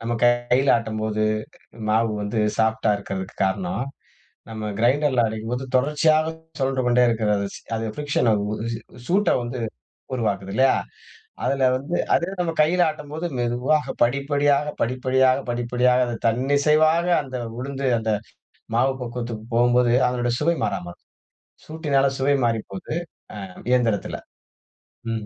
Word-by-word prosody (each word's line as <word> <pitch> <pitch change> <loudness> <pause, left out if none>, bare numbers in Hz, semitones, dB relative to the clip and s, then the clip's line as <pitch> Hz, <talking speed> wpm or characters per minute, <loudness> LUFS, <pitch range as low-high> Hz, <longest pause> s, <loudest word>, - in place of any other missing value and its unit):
நம்ம 115 +1 -3
கைல 120 +2 +3
ஆட்டம் 110 -2 -4
போது 110 0 -1 0.7
மாவு 110 +1 +2
வந்து 105 +2 -1 0.2
சாஃப்ட்டா 110 -1 +2
இருக்கறதுக்கு 95 -2 -6
காரணம், 95 +5 -1 0.6
நம்ம 110 -1 -5
க்ரைன்டர்ல 130 +1 +3
அரைக்கும்போது 115 +4 -4
தொடர்ச்சியாகச் 155 +4 +2 0.2
சொழன்று 130 -1 0
கொண்டே 125 0 +4
இருக்கிறது. 105 -3 +1 0.3
அது 110 - -3
ஃப்ரிக்சன் 145 -4 0 0.5
சூ - - -4 0.3
சூட்ட 200 +4 +3
வந்து 120 +1 -5 0.5
உருவாக்குது 100 -5 -2
இல்லயா? 130 +3 +4 0.7
அதுல 135 -1 +2
வந்து 140 +7 -2 0.2
அதே 170 - +3
இது 190 -1 -8
நம்ம 165 -2 -1
கையில 175 +4 +3
ஆட்டும் 150 -2 -5
போது, 160 +3 -4
மெதுவாக 125 +5 0
படிப்படியாக 140 +3 +1
படிப்படியாக 130 +1 +2
படிப்படியாக 125 +1 +2
அது 120 - -3
தன்னிசைவாக 150 +7 +3 0.2
அந்த 130 -3 -6 0.2
உளுந்து 135 +1 -3
அந்த 110 -1 -1 0.7
மாவு 135 +3 +3
பக்குவத்துக்குப் 115 -1 -6
போகும்போது, 120 0 +4
அதனோட 120 -1 -1
சுவை 170 +3 +2
மாறாம 90 - -3
இருக்கும். - - -26 0.6
சூட்டினால 145 -4 +1
சுவை 140 +2 +3
மாறிப்போகுது. 115 - -3 0.4
அ - - -6 0.3
இயந்திரத்துல. 115 -5 +1 0.9
ம். 110 -2 -4
125 Hz, 125 wpm, -23 LUFS, 115-145 Hz, 0.9 s, கொண்டே